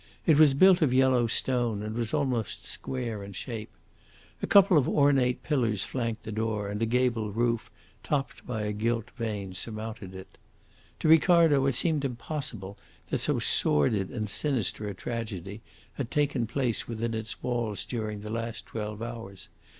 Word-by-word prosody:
It 155 -3 +5
was 150 -3 +6
built 185 +4 +6
of 130 -5 +3
yellow 130 -2 +4
stone, 120 -3 0
and 110 0 -4
was 115 -2 -2
almost 125 -7 -1
square 120 -6 -3
in 100 0 -9
shape. 110 +2 -6 0.7
A - - -2
couple 195 -2 +6
of 145 -5 +4
ornate 135 -4 +3
pillars 115 -9 +1
flanked 115 -4 -3
the 110 - -6
door, 110 -1 -2
and 105 +2 -4
a 115 - +2
gable 115 -3 +1
roof, 115 +1 0 0.3
topped 140 -2 -2
by 110 -4 -2
a 105 - -1
gilt 115 +2 -1
vane, 105 -5 -4
surmounted 110 -1 -6
it. 95 - -12 0.6
To - - +1
Ricardo 160 -4 +5
it 135 - +1
seemed 155 0 +2
impossible 120 -6 -5 0.3
that - - +1
so - - +1
sordid 95 +7 +2
and 110 -3 -3
sinister 110 -1 0
a 100 - -6
tragedy 105 -2 -5 0.3
had 130 -4 -4
taken 145 -5 0
place 125 -1 -1
within 115 0 -3
its 110 0 -4
walls 120 -6 -2
during 110 -4 -4
the 105 +1 -7
last 115 0 -4
twelve 105 0 -5
hours. 115 -5 -8
115 Hz, 165 wpm, -28 LUFS, 105-130 Hz, 0.7 s, was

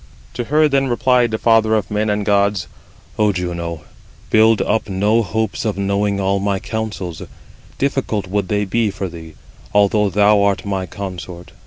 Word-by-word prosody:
To 120 - -4
her 150 +4 +3
then 135 -1 +1
replied 125 0 +2
the 110 - -2
father 110 -1 +3
of 105 -2 -2
men 105 +1 0
and 105 0 -1
gods: 100 -2 +2 0.5
"O 105 -1 +4
Juno, 85 -3 -4 0.5
build 110 0 +5
up 110 -1 0
no 105 +4 +2
hopes 110 +2 -2
of 105 -3 -2
knowing 100 0 0
all 100 0 +1
my 100 0 0
counsels; 100 -6 -5 0.6
difficult 135 -7 -1
would 100 0 -2
they 105 +2 0
be 110 +3 0
for 100 -1 -4
thee, 80 -2 -11 0.4
although 105 0 +3
thou 105 +2 +4
art 100 0 +1
my 95 -2 -2
consort. 90 -2 -8
105 Hz, 165 wpm, -18 LUFS, 95-110 Hz, 0.6 s, build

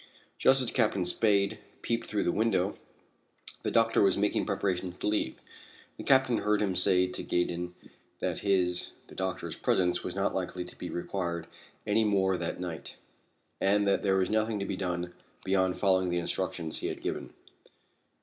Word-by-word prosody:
Just 135 0 +5
as 120 - +1
Captain 100 -4 +2
Spade 100 +1 +2 0.2
peeped 115 0 -1
through 105 - 0
the - - +2
window 100 -2 +1 0.9
the - - -1
doctor 115 0 +3
was 95 -2 +4
making 105 +1 +1
preparations 95 -3 -1
to - - -5
leave. 105 -11 0 0.6
The - - -7
Captain 130 -3 +4
heard 105 0 +2
him 95 -3 0
say 90 -1 +4
to 90 - -4
Gaydon 90 0 -1 0.4
that - - -2
his 90 -3 +1
(the - - -15
doctor's) 95 -1 -3
presence 90 -1 +1
was - - -4
not - - 0
likely 90 -1 -3
to 90 - -10
be 90 - -6
required 85 -2 -3 0.4
any 105 +2 +3
more 95 -3 +2
that 85 -1 -3
night, 85 -3 -5 0.6
and 100 +1 +3
that 100 - +3
there 95 -2 +2
was 95 +1 +1
nothing 110 0 +1
to 100 - -2
be 95 - -2
done 90 -2 -3 0.3
beyond 95 -1 +2
following 95 -2 +3
the 85 - 0
instructions 85 -2 -2
he - - -2
had - - -5
given. - - -4
95 Hz, 170 wpm, -30 LUFS, 90-105 Hz, 0.9 s, Just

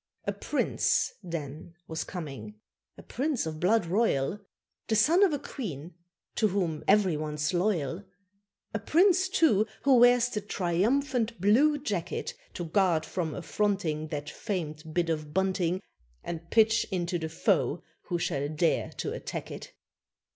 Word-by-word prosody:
A - - 0
Prince, - - 0
then, 165 -2 -6
was 160 -1 -3
coming 135 - -7 0.4
a - - -12
Prince 275 - -1
of 155 -1 -5
Blood 195 +3 +3
Royal 185 -3 +1 0.5
The 220 - +1
son 315 - +4
of 395 -4 +5
a 290 - 0
Queen 175 - -7 0.4
to 220 - +2
whom 180 -6 -1
every 195 -4 +4
one's 150 +1 -2
loyal; 175 -2 0 0.7
A 220 - -1
Prince, 370 - +3
too, 250 - +3 0.2
who 270 -2 +5
wears 245 0 +6
the 210 -4 -3
triumphant 225 +6 0
blue 255 - +4
jacket, 205 - -3 0.2
To 175 - -4
guard 170 -2 +2
from 165 -5 -3
affronting 180 -5 -1
That 150 -1 -5
famed 160 -5 -5
bit 170 +1 0
of 155 -1 -4
bunting, 190 -1 0 0.4
And 170 0 -6
pitch 220 0 +4
into 175 -1 -1
the 160 -1 -4
foe 160 - +1 0.2
who 175 - -1
shall 145 -3 -1
dare 155 +2 +1
to - - -4
attack - - -6
it. - - -8
180 Hz, 145 wpm, -28 LUFS, 160-220 Hz, 0.7 s, wears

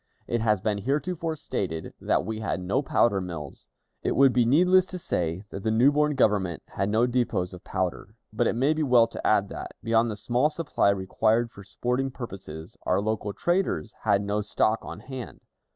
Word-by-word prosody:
It 120 -1 -1
has 105 -3 +2
been 105 -1 0
heretofore 160 - -1
stated 85 - -4
that - - +1
we 110 +1 -4
had 110 -4 -2
no 95 +9 0
powder 115 -7 +2
mills. 80 -6 -7 0.3
It - - -1
would 135 -1 +5
be 120 -2 +3
needless 180 +7 +5
to 185 - -6
say 90 - -2
that 95 - -6
the 110 - 0
new 120 +6 +5
born 150 0 +2
Government 100 - +1
had 95 +1 -2
no 110 +3 +3
depots 120 -7 0
of 90 - -11
powder, 95 +2 -3 0.2
but 115 +1 +1
it - - 0
may 135 +6 +3
be 155 - -2
well 125 -5 +5
to 115 - -5
add - - +3
that, - - -7
beyond 115 0 +2
the 105 - -3
small 125 +7 +1
supply 155 -9 +1
required 110 +4 +1
for 100 - -12
sporting 125 +7 -1
purposes, 95 - -8
our 90 - +1
local 105 0 -2
traders 175 - -1
had 100 -2 +2
no 105 +1 -1
stock 110 +2 +1
on - - -8
hand. 130 -3 -8
110 Hz, 195 wpm, -26 LUFS, 100-130 Hz, 0.3 s, would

